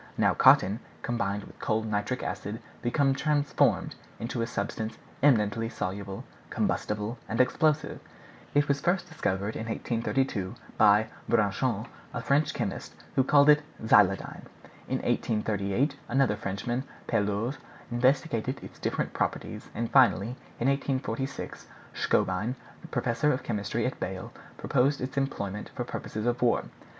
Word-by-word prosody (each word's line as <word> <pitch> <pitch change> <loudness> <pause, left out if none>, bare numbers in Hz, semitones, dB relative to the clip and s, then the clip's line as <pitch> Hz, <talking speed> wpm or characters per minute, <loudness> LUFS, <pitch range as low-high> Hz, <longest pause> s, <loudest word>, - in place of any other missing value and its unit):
Now - - +4
cotton, 100 +4 +5 0.2
combined 105 -4 -1
with - - -14
cold 110 0 0
nitric 105 +4 -1
acid, 100 +3 -4 0.2
become 135 +3 +2
transformed 145 0 +2 0.2
into 115 +1 -3
a 115 - 0
substance 110 -1 -3 0.2
eminently 115 -5 +3
insoluble, 100 -2 -4 0.3
combustible, 105 +3 -1
and 115 - -2
explosive. 150 +4 +2 0.6
It 145 0 +4
was 140 -1 +1
first 175 +2 +1
discovered 105 - -2
in 110 - -4
1832, 115 -3 -1 0.2
by 105 +1 +6 0.2
Braconnot, 110 +1 +1 0.3
a 115 - -2
French 140 +5 +3
chemist, - - -4 0.2
who 130 - +5
called 145 +2 +5
it 150 0 +7 0.2
xyloidine. 100 -3 +3 0.4
In - - -2
1838 110 +6 0
another 130 -4 +3
Frenchman, 105 +5 -3 0.2
Pelouze, 105 +6 0 0.3
investigated 130 +1 +1
its - - -11
different - - -1
properties, - - -3
and 115 0 -2
finally, 120 -6 +5 0.3
in 120 - +1
1846, 135 -1 -2 0.3
Schonbein, 105 +7 +1 0.3
professor 115 +6 +1
of 130 - -1
chemistry 105 +1 -1
at 130 - -2
Bale, 95 0 -5 0.2
proposed 135 +2 +2
its 130 +1 -4
employment 105 -7 -2
for - - -2
purposes 110 +1 -5
of 120 0 0
war. 120 -1 +3
115 Hz, 130 wpm, -28 LUFS, 105-135 Hz, 0.6 s, it